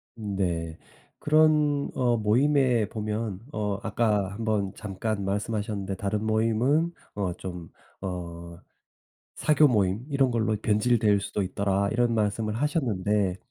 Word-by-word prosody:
네. 90 -7 -2 0.4
그런 150 -2 +3
어 120 -2 +1
모임에 120 +1 +2
보면 105 -2 -3
어 105 -4 -2
아까 105 -3 +1
1 105 - -7
번 105 -3 0
잠깐 105 0 -3
말씀하셨는데 100 -1 -2
"다른 105 +2 -2
모임은 115 +9 +2 0.2
어 95 -3 -1
좀 90 -2 -8 0.3
어 85 -2 -6 0.8
사교 150 0 +4
모임 105 -2 +1
이런 135 -2 +2
걸로 110 -2 +1
변질될 105 0 +2
수도 100 +1 -2
있더라." 100 +1 0
이런 120 0 +2
말씀을 110 0 0
하셨는데 105 - 0
105 Hz, 240 characters per minute, -26 LUFS, 100-120 Hz, 0.8 s, 사교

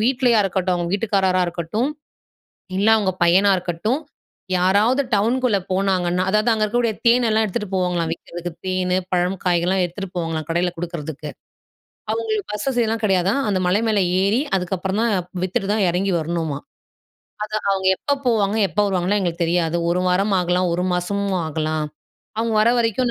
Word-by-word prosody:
வீட்லயா 245 0 +3
இருக்கட்டும், 185 -1 0
அவுங்க 175 -1 -2
வீட்டுக்காரரா 195 -3 +1
இருக்கட்டும், 175 - -2 0.9
இல்ல 205 +3 +3
அவுங்க 195 -3 0
பையனா 190 +4 +5
இருக்கட்டும். 180 - -2 0.6
யாராவது 205 +9 +3
டவுனுக்குள்ள 230 +1 +2
போனாங்கன்னா, 185 -2 +1
அதாவது 215 +3 +2
அங்க 215 -1 +1
இருக்கக்கூடிய 230 0 0
தேன் 240 +1 +5
எல்லாம் 220 0 +3
எடுத்துட்டு 205 +1 -3
போவாங்கலாம், 175 -3 0
விக்கிறதுக்கு. 170 0 -7
தேனு, 185 0 0 0.2
பழம், 180 +1 +1
காய்கள்லாம் 180 +1 +2
எத்துட்டு 195 +2 -7
போவாங்கலாம் 165 -3 -3
கடையில 175 +2 +1
குடுக்குறதுக்கு. 160 -3 -5 0.9
அவுங்களுக்கு 435 -3 -2
பஸ் 210 +4 -4
வசதிலாம் 230 -3 0
கிடையாதாம். 195 +6 +2
அந்த 190 -2 +1
மலை 195 +5 +2
மேலே 205 -3 +2 0.2
ஏறி 215 +6 +2 0.2
அதுக்கப்புறம் 190 +2 -2
தான் 230 -1 +2 0.3
வித்துட்டு 190 +1 -1
தான் 210 -3 +2
இறங்கி 185 +3 0
வரணுமாம் 160 -3 -3 0.8
அது 215 - -8 0.2
"அவுங்க 190 -1 +1
எப்ப 285 - -2
போவாங்க, 215 -3 +2
எப்ப 160 - -15
வருவாங்கன்லாம் 195 +1 +1
எங்களுக்கு 175 -1 -2
தெரியாது. 170 0 +1
ஒரு 175 +1 +1
வாரம் 195 +3 +1
ஆகலாம். 180 0 +1
ஒரு 180 - -1
மாசமும் 195 +2 -1
ஆகலாம். 155 0 -2 0.5
அவுங்க 225 0 0
வர 225 - +4
வரைக்கும் 235 +1 +1
190 Hz, 150 wpm, -21 LUFS, 175-215 Hz, 0.9 s, பையனா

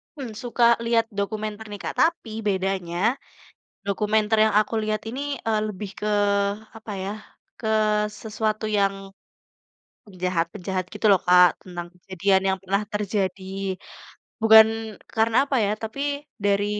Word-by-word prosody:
hmm, 265 -6 -6
suka 240 0 0 0.2
lihat 230 -1 +3
dokumenter 215 +1 -3
nih, 205 - -6
Kak, - - -4
tapi 325 -8 +2 0.2
bedanya, 190 -3 -1 0.9
dokumenter 210 +2 +1
yang 215 - +1
aku 215 - -6
lihat 215 0 -1
ini, 255 +4 -5 0.3
eee, 220 -1 +1
lebih 205 0 -6
ke, 210 - -2 0.7
apa 220 -1 -9
ya, 195 - -3 0.5
ke 220 - -4 0.5
sesuatu 215 0 -2
yang, 195 -1 +3 1.1
penjahat-penjahat 185 -1 -2
gitu - - -1
loh 200 - +7
Kak. 180 -1 +6
Tentang 175 -2 -6
kejadian 190 +1 +1
yang 190 - -2
pernah 195 +2 0
terjadi. 200 -2 -2 1.0
Bukan, 220 0 +9 0.5
karena, 225 +1 +2
apa 275 - 0
ya, 200 - +1
tapi 285 +6 -3
dari 205 -2 +1
210 Hz, 130 wpm, -24 LUFS, 190-220 Hz, 1.1 s, Bukan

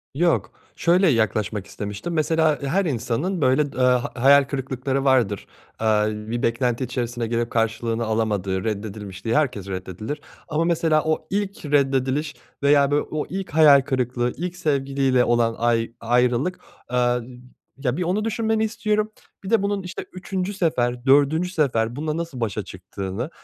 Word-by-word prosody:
Yok. 170 +2 +1 0.2
Şöyle 180 +3 +3
yaklaşmak 110 - 0
istemiştim, 105 +12 -5
mesela 160 -1 +2
her 175 +8 0
insanın 145 - -1
böyle 140 +2 +2
d - - -11
aaa, 125 -1 +1
hayal 140 +1 +7
kırıklıkları 135 0 -2
vardır, 120 -8 +2 0.3
eee, 105 -1 +3 0.2
bir 120 +1 -2
beklenti 120 +2 0
içerisine 120 -1 -3
girip 115 0 -1
karşılığını 115 0 0
alamadığı, 105 -4 -1
reddedilmiş 105 -3 -5
diye 115 0 +1
herkes 125 -10 0
reddedilir 95 - -5 0.3
ama 160 0 0
mesela 160 -2 +2
o 155 0 -1
ilk 200 -3 -3
reddediliş 140 +1 +1 0.3
veya 140 0 +4
böyle 145 +1 +3
o 155 -1 -2
ilk 190 +1 -4
hayal 145 -3 +7
kırıklığı 125 -2 -1
ilk 180 +2 -4
sevgiliyle 135 -5 +1
olan 120 -1 +2
ay 115 -1 +1
ayrılık 125 +8 +1 0.3
Eee, 125 - 0 0.8
ya, 135 -1 -1
bir 180 - 0
onu 190 +5 0
düşünmeni 220 0 0
istiyorum. 215 -1 0 0.3
Bir 190 - -6
de 225 -3 +3
bunun, 200 -1 -1
işte, 180 -1 -6
3'üncü 185 +1 -3
sefer, 125 -9 0
4'üncü 145 +6 +4
sefer 120 -9 0
bununla 155 +2 -2
nasıl 165 -7 -5
başa 105 -2 -2
çıktığını, 95 - -6
135 Hz, 150 wpm, -23 LUFS, 115-160 Hz, 0.8 s, hayal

